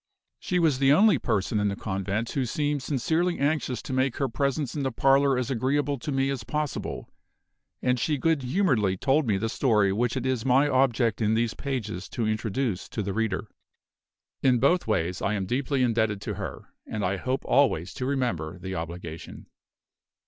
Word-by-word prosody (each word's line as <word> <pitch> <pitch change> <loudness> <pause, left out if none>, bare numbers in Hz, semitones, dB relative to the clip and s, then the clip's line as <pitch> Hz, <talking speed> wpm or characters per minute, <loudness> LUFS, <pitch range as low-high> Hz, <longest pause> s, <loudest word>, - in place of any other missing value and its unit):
She 180 - -1
was 160 -7 +2
the 135 0 +4
only 190 - +5
person 105 -1 0
in 105 - +1
the 100 - -1
convent 100 +3 -3
who 135 - 0
seemed 145 +3 -1
sincerely 160 +7 0
anxious 140 -4 -1
to - - -5
make 130 0 +1
her 135 - +1
presence 140 +2 -1
in 150 - -3
the 135 -1 -1
parlor 135 +2 +3
as 125 0 -2
agreeable 140 +3 0
to 150 +4 -4
me 135 0 +1
as 130 -5 -4
possible; 150 +4 -4 0.7
and 125 -1 +2
she 150 +3 0
good 160 +2 +1
humoredly 125 - +1
told 135 +6 +2
me 105 -3 +2
the 115 - -1
story 105 -5 +2
which 120 +4 0
it 130 - -3
is 130 -3 0
my 135 +3 +4
object 130 -5 +2
in 110 0 +2
these 115 0 +1
pages 110 -9 -4
to 115 - -2
introduce 110 -1 -2
to 105 - -3
the 100 0 -3
reader. 110 -2 -1 1.0
In 130 -2 +4
both 140 +7 +2
ways 90 -3 0
I 105 - 0
am 95 -2 -2
deeply 130 +4 0
indebted 110 -4 +1
to - - -4
her; - - -7
and 105 -2 -2
I 95 +2 0
hope 130 +7 -2
always 130 - +2
to 125 - -3
remember 110 - -1
the 95 +1 -6
obligation. 85 -2 -7
125 Hz, 185 wpm, -26 LUFS, 105-140 Hz, 1.0 s, only